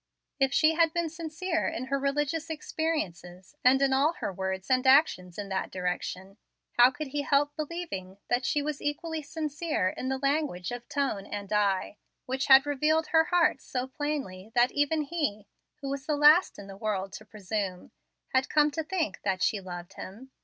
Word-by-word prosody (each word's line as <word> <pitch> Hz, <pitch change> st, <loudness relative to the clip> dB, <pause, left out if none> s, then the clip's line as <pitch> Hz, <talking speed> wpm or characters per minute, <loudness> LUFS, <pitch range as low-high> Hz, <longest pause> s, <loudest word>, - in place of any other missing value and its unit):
If 270 Hz, -1 st, +3 dB
she 310 Hz, +2 st, +4 dB
had 325 Hz, -1 st, +3 dB
been 340 Hz, -2 st, 0 dB
sincere 330 Hz, +1 st, -2 dB
in 250 Hz, -, -3 dB
her 275 Hz, +1 st, -1 dB
religious 295 Hz, +4 st, -1 dB
experiences, 200 Hz, -, -4 dB
and 260 Hz, +1 st, +6 dB
in 270 Hz, -1 st, +3 dB
all 285 Hz, +5 st, +3 dB
her 200 Hz, -, -4 dB
words 190 Hz, 0 st, -3 dB
and 255 Hz, 0 st, +3 dB
actions 260 Hz, -, +4 dB
in 205 Hz, -1 st, -4 dB
that 190 Hz, 0 st, -2 dB
direction, 185 Hz, +2 st, -4 dB, 0.3 s
how 245 Hz, +1 st, +6 dB
could 280 Hz, +2 st, -6 dB
he 290 Hz, +2 st, -2 dB
help 290 Hz, +1 st, +1 dB
believing 305 Hz, -, -5 dB
that 245 Hz, +1 st, +1 dB
she 290 Hz, +1 st, 0 dB
was 300 Hz, -1 st, -3 dB
equally 320 Hz, +2 st, -3 dB
sincere 305 Hz, -, -2 dB
in 255 Hz, -, -4 dB
the 265 Hz, -, 0 dB
language 275 Hz, -, -1 dB
of 240 Hz, 0 st, -7 dB
tone 265 Hz, -9 st, -1 dB
and 205 Hz, 0 st, -5 dB
eye, 205 Hz, -1 st, +1 dB, 0.3 s
which 260 Hz, +1 st, -2 dB
had 270 Hz, +1 st, +8 dB
revealed 300 Hz, +3 st, +1 dB
her 320 Hz, 0 st, +4 dB
heart 345 Hz, -6 st, +2 dB
so 250 Hz, -1 st, -3 dB
plainly 260 Hz, -, -4 dB
that 245 Hz, +1 st, +4 dB
even 290 Hz, +2 st, +1 dB
he, 285 Hz, -10 st, -2 dB, 0.4 s
who 275 Hz, -, -4 dB
was 275 Hz, 0 st, -4 dB
the 300 Hz, -2 st, +1 dB
last 300 Hz, +5 st, +6 dB
in 200 Hz, -, -9 dB
the 195 Hz, 0 st, -10 dB
world 195 Hz, -2 st, -2 dB
to -, -, -8 dB
presume, 200 Hz, -3 st, -4 dB, 0.4 s
had 260 Hz, 0 st, +1 dB
come 300 Hz, 0 st, +4 dB
to 320 Hz, +2 st, -3 dB
think 320 Hz, -, -2 dB
that 190 Hz, -2 st, -1 dB
she 205 Hz, -, +1 dB
loved 175 Hz, 0 st, -8 dB
him? 225 Hz, +8 st, -10 dB
270 Hz, 185 wpm, -28 LUFS, 200-305 Hz, 0.4 s, had